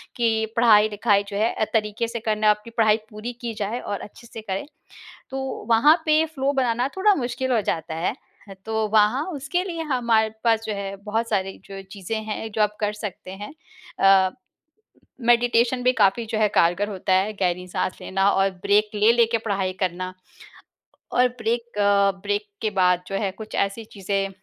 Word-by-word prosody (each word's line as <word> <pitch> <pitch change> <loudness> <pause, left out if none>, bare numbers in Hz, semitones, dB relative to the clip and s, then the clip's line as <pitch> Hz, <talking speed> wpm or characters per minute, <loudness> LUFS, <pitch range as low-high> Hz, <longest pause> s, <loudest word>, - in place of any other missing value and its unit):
कि 225 -2 +1
पढ़ाई-लिखाई 210 -2 +4
जो 200 0 -5
है 220 +3 +2
अ, 220 - 0
तरीके 215 +1 0
से 235 +1 -5
करना 215 -1 +1
आपकी 210 +2 0
पढ़ाई 220 -2 +3
पूरी 215 +3 -6
की 235 -1 -4
जाए 215 +3 -3
और 205 -4 -5
अच्छे 235 +3 -12
से 225 - -9
करें। 195 +2 -4 0.7
तो 270 - -4 0.3
वहाँ 275 +7 +6
पे 310 +1 +4
फ़्लो 280 -3 -1
बनाना 250 -2 0
थोड़ा 410 +2 +4
मुश्किल 255 -2 -2
हो 230 - +3
जाता 160 -3 -3
है। 165 +2 -1 0.3
ह 195 - -9
तो 220 -1 0
वहाँ 220 +7 +3
उसके 315 +5 -2
लिए 335 -4 -4
हमारे 230 -3 +2
पास 225 -1 +3
जो 215 - -2
है 200 0 -5
बहुत 225 +2 -1
सारी 195 -3 -1
जो 195 0 -9
चीज़ें 200 +2 -5
हैं 220 +1 -5
जो 215 - +1
आप 210 0 0
कर 210 0 0
सकते 205 -3 -7
हैं। 205 +6 -8 0.5
अ, 195 -1 +5 1.0
मेडिटेशन 240 +1 +3
भी 250 - +5
काफ़ी 225 0 +2
जो 220 - 0
है 215 - +4
कारगर 175 +5 +3
होता 190 -1 -1
है 195 +3 +2
गहरी 180 0 0
साँस 180 - -2
लेना 195 +1 +1
और 195 0 +2
ब्रेक 210 +1 +3
ले 210 +2 +5
लेके 235 -1 +3
पढ़ाई 195 -4 -2
करना। 185 0 -3 1.0
और 250 +1 +4
ब्रेक 235 0 -2
अ, 200 -1 +4
ब्रेक 205 +1 -2
के 220 - 0
बाद 180 0 +3
जो 195 - -4
है 195 -2 -1
कुछ 215 +3 -9
ऐसी 200 +3 -1
चीज़ें 195 0 -2
215 Hz, 185 wpm, -23 LUFS, 200-235 Hz, 1.0 s, वहाँ